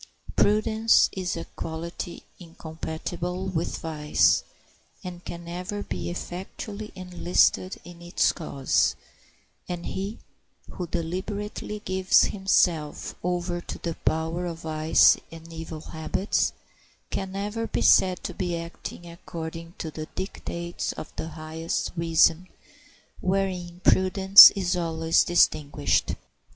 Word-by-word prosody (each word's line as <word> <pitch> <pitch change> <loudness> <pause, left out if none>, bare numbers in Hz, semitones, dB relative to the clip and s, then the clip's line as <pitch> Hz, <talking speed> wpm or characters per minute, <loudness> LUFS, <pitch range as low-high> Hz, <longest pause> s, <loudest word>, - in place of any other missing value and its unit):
Prudence 220 +2 +4
is 185 -3 -3
a 165 - -5
quality 170 +2 -6 0.2
incompatible 170 +2 -5
with 175 -3 -2
vice, 150 -2 +2 0.6
and 175 -1 -8
can 170 0 -8
never 180 +4 -5
be - - -4
effectually 195 +4 -6
enlisted 180 0 +1
in 175 -1 -12
its 175 +1 +2
cause, 140 -5 0 0.7
and 175 -1 -4
he 195 +3 -4 0.5
who 180 - -5
deliberately 200 +5 -4
gives 190 +2 +4
himself 175 -6 +1
over 175 0 -1
to - - -7
the 170 - -4
power 165 +3 -1
of 165 -1 -6
vice 155 0 +4
and 165 0 -11
evil 160 -1 -7
habits 160 +6 -1 0.6
can 190 -1 -3
never 210 +3 -3
be - - -1
said 185 -1 +4
to - - -4
be 175 -2 -2
acting 170 +1 -8
according 165 0 -8
to 160 - -5
the 155 0 -6
dictates 175 -2 -4
of - - -9
the - - -4
highest 160 +1 -4
reason, 165 +1 +3 0.7
wherein 185 -2 -2
prudence 190 +1 +9
is 185 -2 0
always 165 -1 +2
distinguished. 155 -4 +2
175 Hz, 115 wpm, -26 LUFS, 165-190 Hz, 0.7 s, prudence